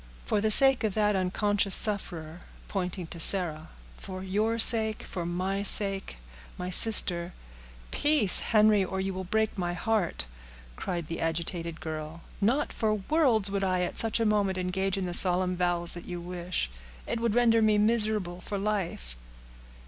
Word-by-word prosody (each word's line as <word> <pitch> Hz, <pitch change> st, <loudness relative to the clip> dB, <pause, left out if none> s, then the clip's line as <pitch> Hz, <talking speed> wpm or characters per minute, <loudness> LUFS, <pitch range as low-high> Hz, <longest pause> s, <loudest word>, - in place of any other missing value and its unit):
"For 205 Hz, -, -1 dB
the 220 Hz, -, 0 dB
sake 270 Hz, +3 st, +8 dB
of 215 Hz, -3 st, -2 dB
that 210 Hz, -1 st, 0 dB
unconscious 200 Hz, +1 st, 0 dB
sufferer"—pointing 180 Hz, -1 st, 0 dB
to 165 Hz, +1 st, -10 dB
Sarah, 165 Hz, -4 st, +5 dB, 0.3 s
"for 185 Hz, 0 st, -9 dB
your 210 Hz, +4 st, -2 dB
sake—for 220 Hz, -6 st, +3 dB
my 185 Hz, +3 st, -4 dB
sake—my 180 Hz, -, -2 dB
sister—" 180 Hz, -4 st, +3 dB, 0.6 s
"Peace, 290 Hz, -10 st, +1 dB
Henry, 215 Hz, -2 st, +2 dB
or 190 Hz, +1 st, -5 dB
you 190 Hz, 0 st, -4 dB
will 190 Hz, 0 st, -6 dB
break 220 Hz, +4 st, -2 dB
my 175 Hz, -1 st, -3 dB
heart," 200 Hz, -, -3 dB, 0.5 s
cried 175 Hz, -, -5 dB
the 165 Hz, +1 st, -7 dB
agitated 165 Hz, 0 st, -5 dB
girl. 155 Hz, +1 st, -8 dB, 0.2 s
"Not 255 Hz, +9 st, -1 dB
for 215 Hz, -2 st, -1 dB
worlds 220 Hz, -3 st, -1 dB
would 200 Hz, -1 st, -3 dB
I 185 Hz, -1 st, -1 dB
at 180 Hz, -, -4 dB
such 225 Hz, 0 st, 0 dB
a 225 Hz, -, -1 dB
moment 205 Hz, -3 st, -1 dB
engage 190 Hz, +1 st, -3 dB
in 190 Hz, -, -4 dB
the 175 Hz, -, -6 dB
solemn 180 Hz, 0 st, +3 dB
vows 175 Hz, -1 st, -2 dB
that 175 Hz, -, -9 dB
you 175 Hz, -1 st, -7 dB
wish. 175 Hz, -, -5 dB, 0.3 s
It 235 Hz, -, -4 dB
would 230 Hz, -2 st, -2 dB
render 230 Hz, -2 st, +2 dB
me 215 Hz, -1 st, +2 dB
miserable 210 Hz, -5 st, -1 dB
for 200 Hz, -, -6 dB
life." 190 Hz, -, -5 dB
190 Hz, 155 wpm, -26 LUFS, 175-215 Hz, 0.6 s, sake